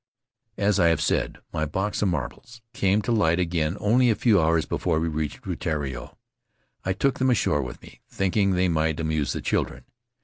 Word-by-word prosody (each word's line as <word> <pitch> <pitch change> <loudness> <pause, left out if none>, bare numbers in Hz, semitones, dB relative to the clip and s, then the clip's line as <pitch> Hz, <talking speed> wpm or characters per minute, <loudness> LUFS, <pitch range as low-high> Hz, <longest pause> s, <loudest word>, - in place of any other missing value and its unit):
As 100 0 +2
I 85 - +5
have 80 -2 +3
said, - - 0 0.2
my 80 0 -1
box 95 +7 -2
of 105 - +2
marbles 105 - -5
came 100 -1 +1
to 120 - -2
light 85 -7 +3
again 85 0 0
only 120 +4 +3
a 110 - +3
few 105 -6 +3
hours 80 0 +2
before 85 -3 0
we 80 - -1
reached 75 -1 -3
Rutiaro. 70 -6 -4 0.7
I 95 - -1
took 130 +8 0
them 130 0 +2
ashore 75 - +2
with 60 -2 -8
me, - - -15
thinking 100 +1 +1
they 90 0 +2
might 80 -1 0
amuse 80 -4 -1
the - - -4
children. - - -1
85 Hz, 190 wpm, -25 LUFS, 80-105 Hz, 0.7 s, I